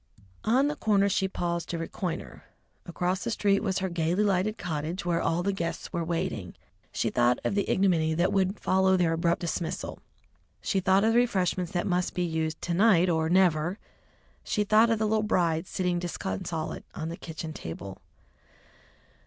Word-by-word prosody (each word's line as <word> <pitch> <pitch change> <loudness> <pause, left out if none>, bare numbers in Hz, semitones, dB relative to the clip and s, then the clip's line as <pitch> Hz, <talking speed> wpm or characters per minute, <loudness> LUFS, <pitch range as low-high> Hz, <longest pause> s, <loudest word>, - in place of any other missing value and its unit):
On 255 +6 +3
the 295 - -1
corner 200 -6 +2
she 190 -1 +1
paused 170 -2 -3
to 170 - -2
reconnoitre. 165 +1 -5 0.4
Across 180 +2 -1
the - - -2
street 200 -3 +2
was 190 -3 -1
her 190 - -1
gaily 170 +3 0
lighted 200 +1 +1
cottage, 165 +3 -4
where 170 -1 +1
all 165 +2 0
the 200 +1 0
guests 170 -3 -4
were 170 - -1
waiting. 165 0 -3 0.4
She - - -1
thought 120 0 +3
of - - 0
the 200 0 0
ignominy 165 -5 +2
that 175 +3 +1
would 195 +1 +1
follow 190 0 +3
their 170 -2 +2
abrupt 170 +1 +1
dismissal, 170 0 -3 0.6
she 195 - 0
thought 190 +1 +3
of 225 +1 +3
the 240 - +5
refreshments 185 -6 0
that 175 +1 0
must 180 -2 0
be 180 - 0
used 160 -1 -2
to 175 - -1
night 185 -2 +4
or 160 -1 +1
never, 175 -1 +3 0.7
she 210 - 0
thought 215 +3 +5
of 225 - +2
the 215 - 0
little 215 0 +2
bride 170 -5 +1
sitting 180 -3 -1
disconsolate 160 - -4
on 160 0 -4
the 170 - -5
kitchen 160 -2 -7
table. 95 - -8
180 Hz, 175 wpm, -28 LUFS, 165-195 Hz, 0.7 s, the